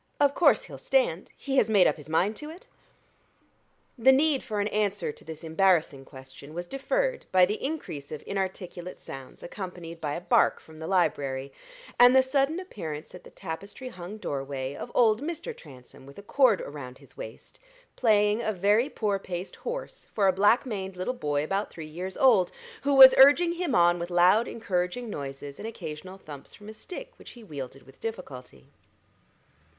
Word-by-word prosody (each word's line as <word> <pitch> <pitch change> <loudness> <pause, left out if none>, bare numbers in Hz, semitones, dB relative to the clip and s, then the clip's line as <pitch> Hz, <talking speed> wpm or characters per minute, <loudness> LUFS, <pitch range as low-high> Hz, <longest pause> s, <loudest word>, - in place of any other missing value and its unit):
Of 285 -1 +4
course 350 - +4
he'll - - -10
stand - - +1
he 270 -1 -3
has 220 - +4
made 200 -4 +5
up - - +3
his 150 0 -12
mind 185 +7 +1
to 300 - -7
it?" 335 +4 -12 1.3
The 265 +3 +7
need 280 +1 +3
for 210 -2 -4
an 205 - +1
answer 205 -5 -1
to - - -15
this 160 0 -9
embarrassing 160 -4 +2
question 135 +3 -13
was 175 +1 -4
deferred - - -2
by 185 -1 +6
the 210 +4 -4
increase 265 - -5
of 155 - -7
inarticulate 185 -2 -5
sounds 135 -1 -10
accompanied 175 -3 -8
by 145 -1 -2
a 170 - -5
bark - - +3
from 160 -1 -16
the 160 - -6
library, 140 -7 0 0.5
and 245 +1 +8
the 265 - +7
sudden 275 +5 +1
appearance 160 - -7
at 180 - -11
the - - -13
tapestry 200 +8 -7
hung 180 +1 -9
doorway 135 -6 -4
of 240 - -7
old 225 -1 +4
Mr. 320 +2 -5
Transome 130 -2 -15
with 140 - -14
a 200 - -10
cord 245 -2 +3
around 130 -3 -8
his 135 -2 -19
waist, 110 +2 -10 0.4
playing 210 -1 +3
a 215 - -1
very 205 +7 +2
poor 205 -7 -1
paced 180 -1 -6
horse - - -6
for 200 -3 +3
a 190 - +4
black 205 +8 +3
maned 190 -6 -5
little 185 +8 -2
boy 145 - -1
about 195 +6 -2
three 160 - -9
years 180 +5 -6
old, 220 -9 +4 0.3
who 280 0 +1
was 265 -1 +11
urging 290 +6 +7
him 340 -7 -1
on 175 -1 +4
with 170 +1 -4
loud 180 +6 +4
encouraging 210 +1 -3
noises 140 -1 -7
and 220 - -5
occasional 185 -3 -8
thumps 145 -7 -12
from 210 +1 -12
a - - -8
stick - - -9
which - - -12
he 240 - -14
wielded 135 -7 -8
with 135 - -19
difficulty. 130 - -8
190 Hz, 185 wpm, -27 LUFS, 155-240 Hz, 1.3 s, was